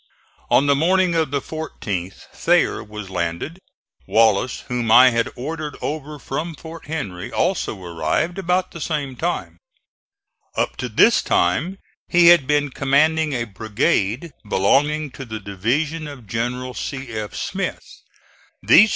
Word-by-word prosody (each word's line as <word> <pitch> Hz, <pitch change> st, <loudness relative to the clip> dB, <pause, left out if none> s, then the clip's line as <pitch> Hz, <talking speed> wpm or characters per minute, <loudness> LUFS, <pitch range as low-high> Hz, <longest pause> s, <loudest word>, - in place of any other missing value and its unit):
On 140 Hz, -, +4 dB
the 140 Hz, -, +4 dB
morning 180 Hz, +5 st, +3 dB
of 160 Hz, -3 st, +1 dB
the 140 Hz, +1 st, 0 dB
14th 100 Hz, -, -5 dB
Thayer -, -, +2 dB
was 105 Hz, -2 st, -9 dB
landed. 85 Hz, -, -3 dB, 0.5 s
Wallace, 110 Hz, +1 st, +3 dB
whom 120 Hz, -2 st, -2 dB
I 125 Hz, +2 st, +8 dB
had 115 Hz, 0 st, 0 dB
ordered 150 Hz, +3 st, -5 dB
over 150 Hz, 0 st, -4 dB
from 155 Hz, +4 st, -4 dB
Fort 165 Hz, +1 st, -10 dB
Henry, 100 Hz, -, -5 dB
also 175 Hz, -, 0 dB
arrived 85 Hz, -, -1 dB
about 180 Hz, 0 st, 0 dB
the 170 Hz, -, -9 dB
same 140 Hz, -3 st, -2 dB
time. 95 Hz, -, -3 dB, 1.0 s
Up -, -, 0 dB
to -, -, -3 dB
this -, -, +5 dB
time 145 Hz, -, +1 dB, 0.3 s
he 170 Hz, -1 st, +6 dB
had 170 Hz, -6 st, +6 dB
been 145 Hz, -1 st, +1 dB
commanding 150 Hz, +3 st, +2 dB
a 120 Hz, -2 st, 0 dB
brigade 110 Hz, -, -1 dB, 0.2 s
belonging 145 Hz, +10 st, +2 dB
to 135 Hz, -, -8 dB
the 110 Hz, -3 st, -6 dB
division 135 Hz, -, -2 dB
of 140 Hz, -5 st, -10 dB
General 125 Hz, +3 st, -3 dB
C. 135 Hz, 0 st, -5 dB
F. 110 Hz, -2 st, -5 dB
135 Hz, 135 wpm, -21 LUFS, 110-160 Hz, 1.0 s, I